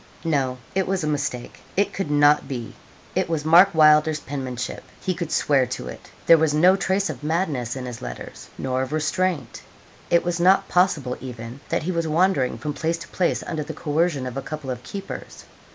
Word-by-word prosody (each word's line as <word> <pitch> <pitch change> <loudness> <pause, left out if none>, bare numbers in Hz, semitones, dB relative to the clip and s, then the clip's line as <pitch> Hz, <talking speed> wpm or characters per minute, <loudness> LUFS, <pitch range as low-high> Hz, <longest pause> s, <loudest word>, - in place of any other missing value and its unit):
No, 135 -5 0 0.2
it 190 0 0
was 190 -2 -1
a - - -1
mistake; 140 -5 -3 0.2
it 200 - +2
could 195 -6 -3
not 145 -1 +4
be. 120 -5 -5 0.4
It - - 0
was 155 -2 -1
Mark 170 +4 +7
Wylder's 155 0 +5
penmanship 130 -3 -5 0.2
he 185 - -1
could 170 -2 -5
swear 135 -3 +2
to 60 - -5
it. - - -11 0.2
There 165 -1 +7
was 155 -2 +2
no 180 +5 +6
trace 195 +1 0
of 130 - -10
madness 150 -7 -1
in 130 -1 -5
his 125 -2 -7
letters, - - -8
nor 130 0 -1
of 130 +2 -3
restraint. 170 +2 -1 0.5
It 170 - +4
was 175 0 -1
not 190 +2 +4
possible 165 -9 +1
even 120 0 -8
that - - 0
he 180 - -1
was 170 -2 -1
wandering 155 -7 +2
from 150 +6 -4
place 165 +3 -1
to - - -10
place 180 - 0
under 160 -2 -3
the 155 +1 -6
coercion 150 -2 0
of 125 0 -5
a - - -2
couple 140 -1 -6
of 125 -1 -5
keepers. 195 +10 -8
150 Hz, 200 wpm, -23 LUFS, 130-170 Hz, 0.5 s, Mark